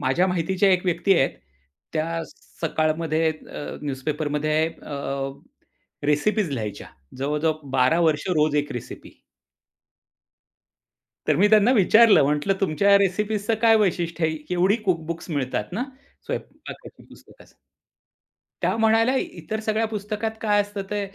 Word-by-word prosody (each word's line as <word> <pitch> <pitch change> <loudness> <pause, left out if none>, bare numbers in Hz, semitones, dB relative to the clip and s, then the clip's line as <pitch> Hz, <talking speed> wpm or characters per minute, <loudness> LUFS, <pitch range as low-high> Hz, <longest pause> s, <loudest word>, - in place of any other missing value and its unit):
माझ्या 135 +8 +2
माहितीच्या 185 +2 +1
एक 180 +1 +1
व्यक्ती 185 +2 +2
आहेत. 135 - +2 0.6
त्या 165 +1 -2 0.4
सकाळमध्ये 160 0 0
अ, 155 -1 -8
न्यूजपेपरमध्ये 150 +2 -1
अ 145 -3 -9 1.1
रेसिपीज 175 +6 +1
लिहायच्या. 110 -6 -5 0.3
जवळजवळ 150 +3 0 0.2
12 135 +6 +3
वर्ष, 160 0 +1
रोज 150 0 +2
1 145 -1 -1
रेसिपी. 120 - -9 2.1
तर - - +3
मी 205 +3 +4
त्यांना 215 +3 +5
विचारलं. 220 - +6
म्हटलं 150 +7 +1
तुमच्या 195 +2 +2
या 200 - +7
रेसिपीजचं 210 +3 0
काय 225 -1 +6
वैशिष्ट्य 170 -5 0
आहे? 160 0 0
केवढी 180 +4 +2
कुक-बुक्स 170 -2 -2
मिळतात 140 +3 -2
ना 240 +7 -2 0.4
स्वयंपाकाच्या - - -8
पुस्तकाचं? - - -18 1.1
त्या - - +1
म्हणाल्या, 225 +3 +3
"इतर 200 +1 -4
सगळ्या 220 +1 0
पुस्तकात 210 +1 -3
काय 210 -2 +2
असतं 205 -1 -4
ते 210 - -1
170 Hz, 120 wpm, -23 LUFS, 155-205 Hz, 2.1 s, या